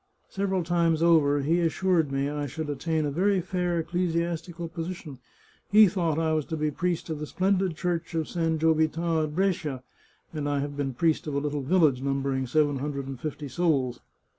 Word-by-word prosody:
Several 190 -2 -1
times 170 -1 +1
over 145 -4 +4
he 165 +5 +2
assured 170 -2 +1
me 135 0 0
I 145 0 -3
should 150 +2 -4
attain 155 +2 -1
a 145 - -1
very 190 +6 +2
fair 180 -1 -1
ecclesiastical 170 0 -2
position; 165 -4 -6 0.5
he 210 +1 +8
thought 170 -4 0
I 160 -1 +1
was 155 -2 0
to 160 - -4
be 150 0 0
priest 175 +1 -2
of 155 - -3
the 150 - -5
splendid 190 -1 +1
Church 175 -2 -2
of 160 -1 -1
San 165 -2 0
Giovita 160 +1 +2
at 150 0 -7
Brescia, 165 -8 -1 0.5
and 145 -2 -2
I 145 - 0
have 145 +1 -3
been 135 -3 -3
priest 160 +2 +1
of 145 - -3
a - - +2
little 145 0 -2
village 145 -3 +3
numbering 135 -1 -1
seven 145 +1 +2
hundred 140 -1 -3
and 135 -2 -7
fifty 150 -1 -5
souls. 135 -4 0
160 Hz, 190 wpm, -27 LUFS, 145-170 Hz, 0.5 s, he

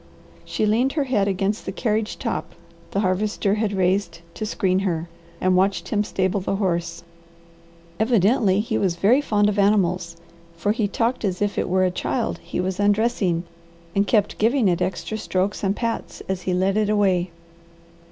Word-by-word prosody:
She 215 - -1
leaned 235 +6 +2
her 300 - +1
head 225 -7 +1
against 195 +2 -1
the - - -1
carriage 215 +1 -1
top 175 - -4 0.3
the 200 - -1
Harvester 200 +1 0
had 215 -1 0
raised 185 -3 0
to 215 - -4
screen 185 -2 +1
her, 175 -4 -1 0.3
and 185 0 +2
watched 185 -2 +1
him 210 -1 +1
stable 190 -1 0
the 195 +1 -2
horse. 170 -4 -2 1.0
Evidently 215 -2 +3
he 225 - -1
was 185 -3 +1
very 220 +10 +4
fond 210 -7 +2
of 210 0 0
animals 185 -4 +2 0.4
for 170 +5 0
he 215 -1 0
talked 230 +5 -1
as 185 -3 -1
if 205 -1 0
it - - -1
were 185 +1 +3
a 180 - +1
child 235 +6 -2
he - - -5
was 185 +1 -2
undressing 205 -4 +1 0.5
and 200 +1 +2
kept 210 -3 +1
giving 230 +1 +3
it 175 -2 +1
extra 205 +4 -2
strokes 195 +1 -1
and 195 0 +1
pats 230 0 -3
as 190 -1 -2
he - - +1
led 190 +2 +1
it 215 -1 +1
away. 190 -4 +2
200 Hz, 175 wpm, -23 LUFS, 185-215 Hz, 1.0 s, very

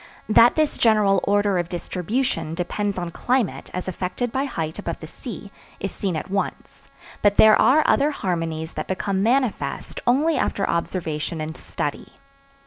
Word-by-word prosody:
That 230 +2 +6
this 310 -1 +1
general 210 -4 +4
order 205 -2 +2
of 175 0 -3
distribution 180 -1 -2
depends 200 +3 -2
on 175 -2 -3
climate 250 +3 -1
as 180 +1 -5
affected 185 +6 -3
by 265 +3 0
height 160 - -4
above - - -4
the - - -8
sea, - - -9 0.3
is - - -3
seen 190 -5 -2
at 160 +4 -5
once, 195 0 -4 0.3
but 205 -1 +3
there 220 0 +8
are 305 +4 +5
other 285 +2 +3
harmonies 165 - -3
that - - -4
become 190 +1 -1
manifest 245 +1 0
only 295 +6 +3
after 195 - 0
observation 165 -2 -2
and 155 +1 -4
study. - - -5
195 Hz, 155 wpm, -23 LUFS, 170-240 Hz, 0.3 s, there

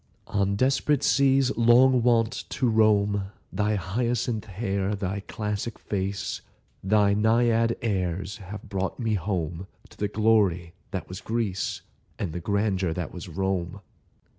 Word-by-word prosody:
On 100 0 0
desperate 135 +4 +2
seas 135 -1 +3
long 120 +2 +5
wont 115 -2 +2
to 130 - 0
roam, 105 -3 +3 0.3
Thy 105 +1 +1
hyacinth 115 +4 -1
hair, 100 0 -2
thy 100 0 -3
classic 105 +2 -4
face, 100 -1 -3 0.4
Thy 100 +1 +3
Naiad 115 +2 +3
airs 95 -1 -2
have 105 0 -8
brought 95 +3 -3
me 115 -3 0
home 90 -2 -2 0.2
To - - -18
the 105 - 0
glory 100 -6 +2 0.2
that - - -5
was 95 +3 -8
Greece, 110 -4 -2 0.4
And 85 -6 -3
the 90 - -3
grandeur 95 -2 0
that 85 -3 -5
was - - -8
Rome. 95 0 -2
105 Hz, 135 wpm, -26 LUFS, 95-115 Hz, 0.4 s, long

